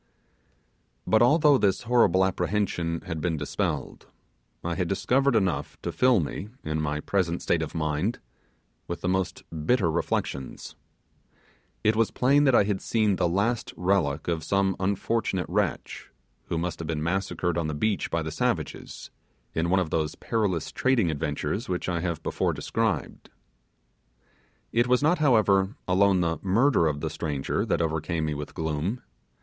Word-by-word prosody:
But 110 - +3
although 145 +2 +5
this 100 0 +1
horrible 115 -5 +4
apprehension 95 -4 -1
had 85 -5 -5
been 85 -2 -1
dispelled, 75 0 -3 0.6
I 85 - -1
had 90 0 -1
discovered 130 +8 +2
enough 95 -5 0
to - - -2
fill 125 -4 +4
me, 95 +5 -4
in 80 0 -2
my 75 0 -2
present 90 -2 -1
state 85 - +1
of 80 - -5
mind, 80 +8 -1 0.7
with 85 - -5
the - - -2
most 95 0 -1 0.2
bitter 100 -10 +3
reflections. 70 -4 -3 1.1
It 110 +1 +3
was 115 0 +2
plain 140 +3 +3
that 135 -3 +5
I - - +6
had 100 -1 -1
seen 105 -4 +1
the 85 - +1
last 105 +7 -1
relic 90 -6 0
of 85 -2 -1
some 95 +2 +1
unfortunate 100 0 0
wretch, - - -2 0.4
who 85 - -3
must 85 0 -3
have 85 - -5
been 75 -2 -2
massacred 90 0 -1
on 85 -2 -1
the 75 - -3
beach 105 +6 0
by 85 -1 -1
the 80 - -4
savages, - - -3 0.4
in 80 +1 0
one 95 +1 +3
of 85 -4 -2
those 80 -1 -1
perilous 100 -8 -1
trading 120 -10 +2
adventures 75 - -3
which 90 -1 -2
I 90 -2 0
have 85 -2 -3
before - - 0
described. 105 - -2 1.4
It 120 +2 +2
was 125 +2 +3
not, 155 +3 +3
however, 105 -8 +3
alone 95 0 +3
the 80 -1 0
murder 100 - +3
of 75 -1 -2
the 80 - -2
stranger 75 -4 -2
that - - +1
overcame 80 0 -1
me 75 - -1
with 75 0 -7
gloom. 80 +9 -2
90 Hz, 160 wpm, -26 LUFS, 80-110 Hz, 1.4 s, I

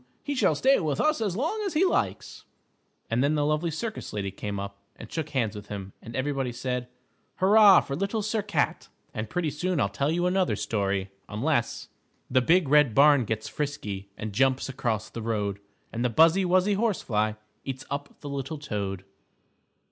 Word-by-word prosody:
He 285 - -2
shall 200 - +2
stay 270 - +4
with 150 -5 -1
us 305 -5 +2
as 200 -5 -1
long 325 - -1
as 390 -5 -2
he 345 +5 +4
likes," 365 - -1 0.7
and 120 +3 +2
then 145 +2 +2
the 145 -1 +1
lovely 150 +3 +1
circus 215 +8 -5
lady 100 -2 -3
came 100 +1 -5
up 100 0 -6 0.2
and 115 - -11
shook 160 -2 -3
hands 115 -7 -1
with 105 0 -8
him, 100 -2 -7
and 115 0 -9
everybody 135 -1 -1
said, 125 0 -3 0.5
"Hurrah 200 0 +7
for 140 - -5
Little 200 +6 -1
Sir 215 +1 0
Cat!" 205 - -1 0.2
And 110 0 -4
pretty 165 0 -1
soon 175 +2 -1
I'll 100 - +2
tell 140 +9 -1
you 175 +2 +1
another 185 +1 +2
story 100 -2 -1 0.2
unless 120 +3 -1 0.4
_The 130 -1 +4
Big 175 +2 +4
Red 150 -5 +4
Barn 140 -3 +6
gets 110 +1 -3
frisky 105 -10 -4
And 110 -1 -5
jumps 130 +3 +2
across 115 -5 -2
the 115 - -7
road, 105 -3 -2 0.3
And 115 +1 -2
the 125 - +2
buzzy, 165 - +5
wuzzy 185 +3 +3
horsefly 130 - 0 0.3
Eats 135 -1 -6
up 140 0 -5
the 145 - -6
little 140 +3 -4
toad. 100 -9 -4
140 Hz, 185 wpm, -27 LUFS, 110-180 Hz, 0.7 s, Hurrah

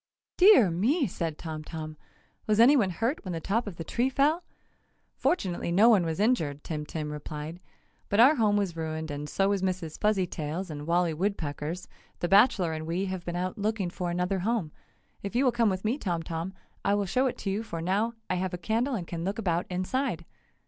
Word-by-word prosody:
"Dear 365 - +7
me!" 255 - +2
said 165 -4 -3
Tom 155 -2 -6
Tom. 155 -1 -6 0.5
"Was 215 0 +2
anyone 240 -4 +6
hurt 230 - -1
when 185 -3 -4
the 165 - -2
top 215 +7 -1
of 195 - -5
the 165 - -5
tree 240 +9 0
fell?" 295 +6 +2 0.7
"Fortunately 185 - 0
no 205 +7 +6
one 205 -6 +5
was 160 +2 -2
injured!" 160 - +1
Tim 150 -2 -4
Tim 150 -1 -4
replied, 150 +2 -6 0.5
"But 200 - +1
our 260 +6 +8
home 210 -3 +3
was 195 -5 -1
ruined 160 -1 -4
and 145 +1 -5
so 195 +4 +1
was 200 -2 +1
Mrs. 185 -4 -3
Fuzzytail's 185 -4 -1
and 145 0 -7
Wally 170 -1 +2
Woodpecker's, 165 -2 -3 0.3
the 175 - -1
bachelor 195 -4 +4
and 155 0 -5
we 175 +4 -1
have 185 -2 -4
been 175 - -3
out 185 +3 -3
looking 205 -3 -1
for 180 0 -3
another 180 +2 0
home. 200 -5 -1 0.5
If 200 +3 -6
you 260 +3 +3
will 250 - +5
come 235 -2 +2
with 190 +1 -3
me, 240 +7 0
Tom 170 - -2
Tom, 165 +4 -4 0.3
I 200 - +3
will 205 -1 0
show 255 +8 +1
it 250 - -3
to 195 - -3
you, 205 +3 -1
for 170 -7 -6
now 200 +7 0
I 185 - 0
have 185 0 -2
a - - -6
candle 230 +8 0
and 185 -6 -4
can 165 0 -5
look 195 +5 -2
about 175 -5 0
inside!" 185 0 -2
185 Hz, 210 wpm, -28 LUFS, 165-220 Hz, 0.7 s, our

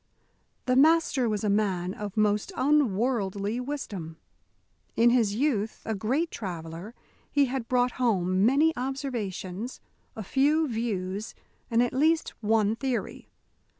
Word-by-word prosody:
The 255 - +2
Master 290 -4 +4
was 210 -1 -2
a - - +1
man 190 -3 0
of 205 0 -7
most 210 - +1
unworldly 230 - +1
wisdom. 210 - -5 0.8
In 235 +1 +5
his 225 -5 +2
youth 225 -5 -1
a 220 - -1
great 260 - -1
traveller, 175 +2 -7 0.4
he 285 -1 +4
had 255 -2 -4
brought 250 0 +2
home 190 -5 +2
many 290 +8 +4
observations, 245 -5 -4 0.4
a 220 - -5
few 295 - +2
views, 215 -4 -3 0.3
and 235 +1 +3
at 245 - -2
least 315 +5 +2
one 215 0 +2
theory. 255 0 -4
230 Hz, 125 wpm, -27 LUFS, 200-265 Hz, 0.8 s, In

